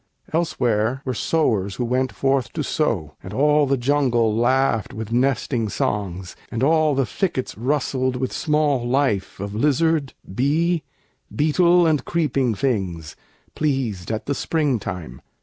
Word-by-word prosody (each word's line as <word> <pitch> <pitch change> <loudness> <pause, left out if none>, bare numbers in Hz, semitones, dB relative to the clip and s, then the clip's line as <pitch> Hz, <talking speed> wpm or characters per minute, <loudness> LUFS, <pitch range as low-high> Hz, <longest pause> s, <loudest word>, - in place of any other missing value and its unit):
Elsewhere 125 -6 0
were 130 - -1
sowers 110 -9 0
who 125 - -2
went 130 +2 0
forth 135 -2 0
to 155 - -2
sow; 105 - -1
And 95 - -9
all 150 +1 +3
the 135 0 +2
jungle 120 -4 +2
laughed 120 -2 +1
with 110 0 -6
nesting 120 -2 +1
songs, 95 -3 -3 0.2
And 115 +2 -2
all 155 0 +3
the 135 -1 +2
thickets 130 - -2
rustled 130 +1 0
with 130 0 -2
small 150 -4 +1
life 120 -9 0
Of 100 +1 -5
lizard, 150 +4 +1 0.2
bee, 160 - +1 0.5
beetle, 170 +3 +4
and 155 -5 +2
creeping 140 -8 0
things, 95 - -2 0.4
Pleased 130 -11 -1
at 110 +2 -3
the 140 - -1
springtime. 105 - -2
130 Hz, 135 wpm, -22 LUFS, 110-150 Hz, 0.5 s, beetle